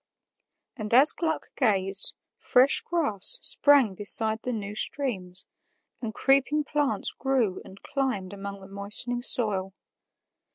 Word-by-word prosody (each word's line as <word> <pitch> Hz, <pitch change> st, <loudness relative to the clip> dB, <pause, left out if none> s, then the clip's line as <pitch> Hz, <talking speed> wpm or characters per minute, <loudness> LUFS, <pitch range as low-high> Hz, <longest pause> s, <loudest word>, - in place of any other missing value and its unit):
And 210 Hz, -1 st, -7 dB
as 275 Hz, +4 st, +7 dB
Gluck 320 Hz, -2 st, -4 dB
gazed, 195 Hz, -6 st, 0 dB, 0.2 s
fresh 255 Hz, +3 st, +3 dB
grass 315 Hz, -, +2 dB
sprang 280 Hz, -8 st, +3 dB
beside 220 Hz, +3 st, +2 dB
the 250 Hz, -, -5 dB
new 205 Hz, -3 st, -6 dB
streams, 200 Hz, -7 st, -3 dB, 0.6 s
and 225 Hz, -3 st, -5 dB
creeping 275 Hz, +5 st, 0 dB
plants 290 Hz, -1 st, 0 dB
grew 255 Hz, -8 st, -2 dB
and 190 Hz, -, -15 dB
climbed 235 Hz, -9 st, -4 dB
among 200 Hz, 0 st, -9 dB
the 190 Hz, -, -13 dB
moistening 205 Hz, +5 st, -3 dB
soil. 200 Hz, -7 st, 0 dB
220 Hz, 120 wpm, -25 LUFS, 200-270 Hz, 0.6 s, as